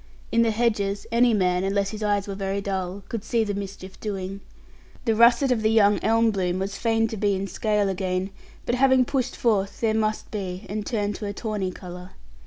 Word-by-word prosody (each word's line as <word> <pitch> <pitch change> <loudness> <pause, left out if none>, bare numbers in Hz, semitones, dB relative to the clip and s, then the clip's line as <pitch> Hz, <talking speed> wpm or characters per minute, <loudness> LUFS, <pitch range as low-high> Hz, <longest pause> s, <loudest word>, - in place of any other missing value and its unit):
In 230 - +4
the 230 - +3
hedges 210 -3 0
any 240 +1 +4
man, 180 -3 +2
unless 195 0 0
his 215 0 -7
eyes 205 -1 0
were 200 - -3
very 195 0 -2
dull, 195 -1 -3
could 225 -3 -4
see 230 -2 +1
the 205 -1 -2
mischief 195 -1 -7
doing. 195 -2 -4 0.6
The 225 - +3
russet 235 +4 +5
of 235 -3 +2
the 215 - +3
young 210 -2 +4
elm 225 +1 +3
bloom 185 -3 -1
was 195 +1 -3
fain 225 -1 +1
to 220 - -5
be 205 -1 +1
in 190 - -2
its 195 - -5
scale 210 -2 +1
again; 190 0 -2 0.3
but - - 0
having 260 0 +4
pushed 255 -1 -1
forth, 200 -4 0
there 225 -2 +1
must 215 -1 -1
be, 190 -2 -4
and 210 +1 -3
turn 210 -3 -1
to 205 +1 -5
a 200 - -3
tawny 210 -3 -2
colour. 180 0 -9
205 Hz, 210 wpm, -25 LUFS, 195-225 Hz, 0.6 s, russet